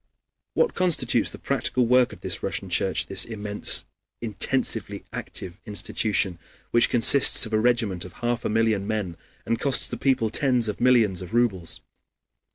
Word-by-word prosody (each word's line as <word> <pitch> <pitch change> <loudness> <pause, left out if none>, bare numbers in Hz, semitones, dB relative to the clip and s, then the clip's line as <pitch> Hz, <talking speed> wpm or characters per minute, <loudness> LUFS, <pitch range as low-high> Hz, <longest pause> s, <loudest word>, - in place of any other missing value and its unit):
What 480 - +1
constitutes 180 -3 +1
the - - -10
practical 125 - -1
work 125 +1 +3
of - - -13
this - - -2
Russian - - -5
Church, - - 0
this - - 0
immense, 105 -2 -1 0.3
intensely 110 -4 -2
active 90 0 -7
institution, 100 -3 -1 0.3
which 120 0 +4
consists 125 +2 +6
of 110 - -9
a 110 - +2
regiment 110 -6 0
of 90 - -11
half 120 0 -3
a - - -2
million 110 -2 0
men 105 -6 -3 0.3
and 115 - -2
costs 140 -2 +3
the - - -6
people 130 -5 0
tens 125 -2 +2
of 105 - -5
millions 115 -7 +2
of 90 +5 -7
rubles? 100 -8 -1
115 Hz, 160 wpm, -24 LUFS, 100-120 Hz, 0.3 s, consists